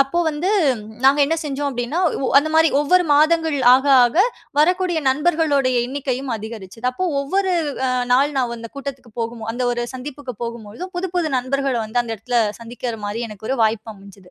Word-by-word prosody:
அப்போ 275 +5 +1
வந்து 310 +5 -2 0.6
நாங்க 275 +2 +6
என்ன 325 +3 0
செஞ்சோம் 285 -1 -2
அப்டீன்னா 245 +6 -3 0.3
உ - - +1
அந்த 310 +2 0
மாரி 320 0 +5
ஒவ்வொரு 360 +5 +3
மாதங்கள் 315 +1 +3 0.2
ஆக 265 +3 +4 0.2
ஆக 240 +6 -1 0.4
வரக்கூடிய 360 +1 +2
நண்பர்களுடைய 285 -3 +2
எண்ணிக்கையும் 265 -1 -3
அதிகரிச்சிது. 220 0 -9
அப்போ 370 +9 -3 0.2
ஒவ்வொரு 375 +6 0 0.2
வ் 275 - -6
அ - - 0 0.2
நாள் 280 +3 +3
நான் 245 -3 0
அந்த 230 0 -8
கூட்டத்துக்கு 270 -4 -7
போகும் 230 0 -4
அந்த 250 +1 -3
ஒரு 240 0 -2
சந்திப்புக்கு 265 0 -7
போகும்பொழுதும் 235 - -7
புது 370 +1 -2
புது 330 -4 0
நண்பர்கள 270 +1 -1
வந்து 225 +3 0
அந்த 225 -1 -4
எடத்துல 240 +3 -1 0.2
சந்திக்குற 235 0 -5
மாரி 215 +3 -3
எனக்கு 215 0 -10
ஒரு 270 - 0
வாய்ப்பு 220 0 0
அமஞ்சது. 195 -2 -16
265 Hz, 175 wpm, -20 LUFS, 235-305 Hz, 0.6 s, நாங்க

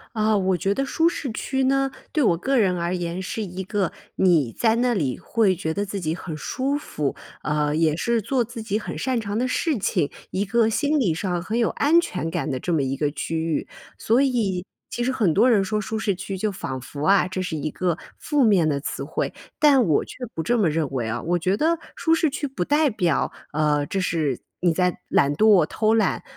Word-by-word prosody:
啊， 215 -1 +2
我 190 -1 +1
觉 195 +4 0
得 275 - 0
舒 325 +4 +2
适 280 -7 -4
区 265 +4 -2
呢， 270 +1 +2 0.2
对 300 -4 +1
我 170 -6 +3
个 270 +9 0
人 185 -4 +2
而 170 +1 -1
言 175 0 -3
是 190 +4 -4
一 190 -2 -5
个， 190 -1 -1 0.2
你 160 -10 +3
在 225 -1 +2
那 245 +1 +2
里 140 - -1
会 205 -5 +1
觉 160 -2 -3
得 200 - -1
自 200 0 -4
己 160 -2 -1
很 165 -2 -6
舒 270 - -1
服， 150 - -3 0.3
呃， 150 0 0
也 160 -1 +2
是 235 +4 +1
做 245 +4 +1
自 235 0 -8
己 215 -2 -1
很 215 - -5
擅 255 -3 -1
长 205 0 -3
的 255 - +1
事 300 +2 0
情， 175 -6 0 0.2
一 195 +2 -1
个 225 +2 +2
心 290 +6 +1
理 180 -11 +1
上 175 0 -2
很 215 +6 -3
有 235 -2 +2
安 320 +4 +3
全 180 - -3
感 160 -4 -2
的 130 - -2
这 175 - -3
么 155 -5 +2
一 135 +1 -1
个 145 +1 0
区 160 +2 -4
域。 160 -1 -1 0.3
所 235 +4 +2
以 220 -10 0 0.2
其 240 - -3
实 255 - +1
很 210 -11 +2
多 235 +6 +5
人 210 -4 +4
说 215 +2 -1
舒 220 +2 -3
适 215 -2 0
区 190 +1 -5
就 210 +3 -1
仿 130 -8 -5
佛 140 +3 -8
啊， 195 -1 +5
这 185 0 -3
是 180 -3 -3
一 155 +1 -3
个 175 -1 -1 0.2
负 295 -3 +1
面 190 -8 +4
的 140 -2 0
词 140 - -4
汇， - - -3 0.2
但 285 -4 +5
我 155 -9 +2
却 - - -10 0.2
不 160 - -2
这 240 +7 +1
么 185 - +3
认 155 0 0
为 125 -4 -2
啊。 120 - -3
我 175 +1 0
觉 185 +4 +1
得 325 +5 +2 0.2
舒 325 - +1
适 320 -1 +3
区 285 +1 -3
不 255 -10 -3
代 295 - +2
表， 180 -6 0 0.2
呃， 150 -1 +1
这 195 - -2
是 160 -8 0 0.2
你 175 - +3
在 180 +1 0
懒 140 +1 +3
惰、 205 -3 +5
偷 215 +7 +1
懒。 215 -4 +1
195 Hz, 250 characters per minute, -23 LUFS, 165-235 Hz, 0.3 s, 多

